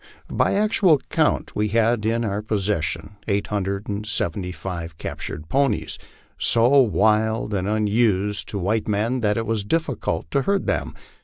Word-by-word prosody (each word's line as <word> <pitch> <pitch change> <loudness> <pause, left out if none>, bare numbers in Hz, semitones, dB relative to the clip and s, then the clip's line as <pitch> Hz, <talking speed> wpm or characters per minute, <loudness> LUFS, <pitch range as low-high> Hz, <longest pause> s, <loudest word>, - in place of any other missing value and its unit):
By - - +2
actual 200 -6 +4
count - - +1
we 105 0 +1
had 115 0 +2
in 115 +1 +1
our 100 0 -2
possession 100 -3 -2
eight 100 -1 +1
hundred 100 0 -2
and 105 0 -3
seventy 90 -3 -2
five 85 -1 -6
captured 75 - -6
ponies, 135 - 0 0.4
so 120 +4 +4
wild 110 +1 +2
and 95 -1 -1
unused 105 -1 +1
to 105 - -3
white 105 +4 0
men 110 +5 0
that 105 -2 +1
it 115 - -1
was 110 -2 -1
difficult 120 - -2
to 140 - +2
herd 200 +5 0
them. - - -1
105 Hz, 155 wpm, -23 LUFS, 100-115 Hz, 0.4 s, actual